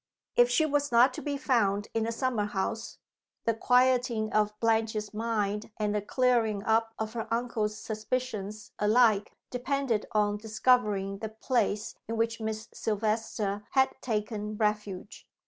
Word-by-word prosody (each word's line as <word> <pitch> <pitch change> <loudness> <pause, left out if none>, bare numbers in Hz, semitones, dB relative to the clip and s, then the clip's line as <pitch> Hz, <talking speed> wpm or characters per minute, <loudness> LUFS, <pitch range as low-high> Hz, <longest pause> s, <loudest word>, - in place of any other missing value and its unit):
If 485 0 +6
she 315 - +3
was 290 -2 0
not 240 +3 +6
to - - -6
be 285 -1 -2
found 215 -8 +1
in 225 -1 0
the 230 - -1
summer 230 -3 0
house, 210 +2 -3 0.5
the 230 - +3
quieting 245 -2 +2
of 210 0 +1
Blanche's 220 -2 0
mind 210 -2 -1
and 210 -1 0
the 210 - 0
clearing 225 -2 +1
up 225 +1 +1
of 220 0 -3
her 225 -1 -5
uncle's 230 -3 -1
suspicions 215 -2 -4
alike 215 -1 +4 0.2
depended 250 -3 -1
on 210 -1 +2
discovering 210 -3 +1
the 220 - -4
place 220 -2 -1
in 225 +1 -3
which 230 0 0
Miss 220 +1 -3
Silvester 215 -1 -1
had 265 -1 +4
taken 210 -2 -3
refuge. 210 -3 -2
220 Hz, 145 wpm, -29 LUFS, 210-240 Hz, 0.5 s, If